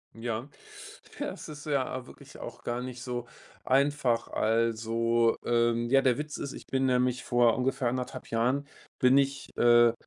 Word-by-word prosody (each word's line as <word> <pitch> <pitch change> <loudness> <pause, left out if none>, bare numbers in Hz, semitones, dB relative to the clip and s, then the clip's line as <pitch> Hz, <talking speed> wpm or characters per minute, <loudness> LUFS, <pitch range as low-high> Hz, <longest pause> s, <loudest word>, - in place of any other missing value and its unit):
Ja. 115 +2 -4 0.7
Ja, - - -2
es - - -9
ist 150 -1 -9
ja 130 -3 -1
wirklich - - -14
auch - - -8
gar 120 +1 -2
nicht 125 -1 -7
so 120 -1 -4 0.4
einfach. 135 -3 +2
Also, 115 +1 +1
ähm, 120 0 +1
ja, 135 +1 +5
der 130 -1 +3
Witz 150 0 -5
ist, 140 - -5
ich - - -11
bin 135 0 0
nämlich 125 -1 +1
vor 120 -2 +3
ungefähr 130 -1 0
anderthalb 125 +1 -5
Jahren 125 +5 0 0.3
bin 130 +2 +5
ich, 140 0 0
äh, 120 0 +6
125 Hz, 160 wpm, -29 LUFS, 115-135 Hz, 0.7 s, äh